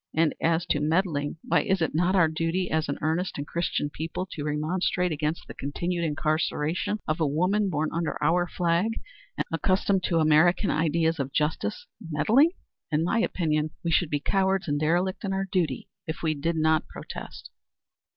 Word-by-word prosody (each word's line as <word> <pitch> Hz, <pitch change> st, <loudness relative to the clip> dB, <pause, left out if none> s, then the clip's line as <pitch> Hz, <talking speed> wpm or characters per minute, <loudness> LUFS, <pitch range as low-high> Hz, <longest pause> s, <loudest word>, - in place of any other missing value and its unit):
And 160 Hz, -1 st, +3 dB
as 165 Hz, +1 st, +2 dB
to 145 Hz, -, +2 dB
meddling, 155 Hz, -1 st, 0 dB
why -, -, +2 dB
is 190 Hz, 0 st, +1 dB
it 160 Hz, -, 0 dB
not 175 Hz, +4 st, +2 dB
our 170 Hz, -4 st, +5 dB
duty 165 Hz, +3 st, -1 dB
as 160 Hz, -1 st, 0 dB
an 140 Hz, -, -1 dB
earnest 165 Hz, +4 st, -1 dB
and 145 Hz, -, -3 dB
Christian 170 Hz, -3 st, -2 dB
people 165 Hz, +5 st, -4 dB
to 145 Hz, -, -5 dB
remonstrate 170 Hz, +4 st, 0 dB
against 155 Hz, +1 st, -2 dB
the -, -, -8 dB
continued 170 Hz, +5 st, -3 dB
incarceration 155 Hz, +5 st, 0 dB
of 155 Hz, +2 st, 0 dB
a 160 Hz, -, +2 dB
woman 185 Hz, +8 st, +1 dB
born 155 Hz, -2 st, -1 dB
under 165 Hz, -2 st, -1 dB
our 175 Hz, +1 st, +2 dB
flag 175 Hz, +6 st, 0 dB, 0.4 s
and -, -, 0 dB
accustomed 185 Hz, +3 st, +1 dB
to 170 Hz, -, +1 dB
American 160 Hz, +5 st, +4 dB
ideas 160 Hz, +1 st, +1 dB
of 135 Hz, 0 st, -2 dB
justice? 155 Hz, -, -1 dB, 0.2 s
Meddling? 215 Hz, -, +4 dB, 0.4 s
In 155 Hz, +1 st, +2 dB
my 205 Hz, +7 st, +1 dB
opinion, 155 Hz, -8 st, 0 dB
we 170 Hz, -, 0 dB
should 170 Hz, -1 st, +2 dB
be 145 Hz, -, 0 dB
cowards 190 Hz, +4 st, +1 dB
and 145 Hz, -1 st, 0 dB
derelict 175 Hz, +6 st, 0 dB
in 195 Hz, -1 st, -1 dB
our 195 Hz, 0 st, -1 dB
duty 160 Hz, -9 st, 0 dB, 0.2 s
if 160 Hz, -, -5 dB
we 160 Hz, -1 st, +2 dB
did 165 Hz, +3 st, -1 dB
not 160 Hz, 0 st, +2 dB
protest." -, -, -9 dB
165 Hz, 180 wpm, -27 LUFS, 155-180 Hz, 0.4 s, our